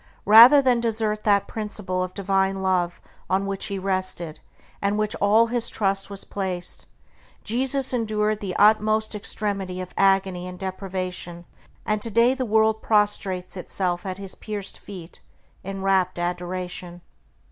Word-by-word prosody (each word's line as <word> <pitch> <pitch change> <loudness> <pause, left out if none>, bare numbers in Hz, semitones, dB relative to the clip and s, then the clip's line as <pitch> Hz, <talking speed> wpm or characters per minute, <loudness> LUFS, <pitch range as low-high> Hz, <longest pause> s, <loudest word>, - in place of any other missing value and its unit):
Rather 235 +7 +9
than 250 -2 +3
desert 220 -2 -1
that 200 -2 +3
principle 210 -4 -4
of 185 0 -4
Divine 195 -1 0
Love 180 -2 0 0.3
on 190 +1 +1
which 195 -1 -3
he 200 - -3
rested, 185 -4 -2 0.4
and 200 0 +1
in - - -1
which 215 0 0
all 210 +3 +4
his 235 0 -1
trust 195 -1 -1
was 200 -1 -5
placed, 185 -3 -4 0.6
Jesus 260 +4 0
endured 215 -2 0
the 195 -3 -4
utmost 215 +1 +3
extremity 200 -3 -3
of 185 -1 -7
agony 195 -2 +2
and 180 0 -8
deprivation; 185 -2 -5 0.4
and 215 0 0
today 230 +3 +3
the 265 -1 -2
world 220 0 +3
prostrates 200 -4 0
itself 180 0 -2
at 185 -2 -5
his 195 -1 -6
pierced 205 -2 -6
feet 180 -4 -11 0.4
in 195 0 -5
rapt 190 -2 +2
adoration. 180 0 -4
195 Hz, 145 wpm, -24 LUFS, 185-215 Hz, 0.6 s, Rather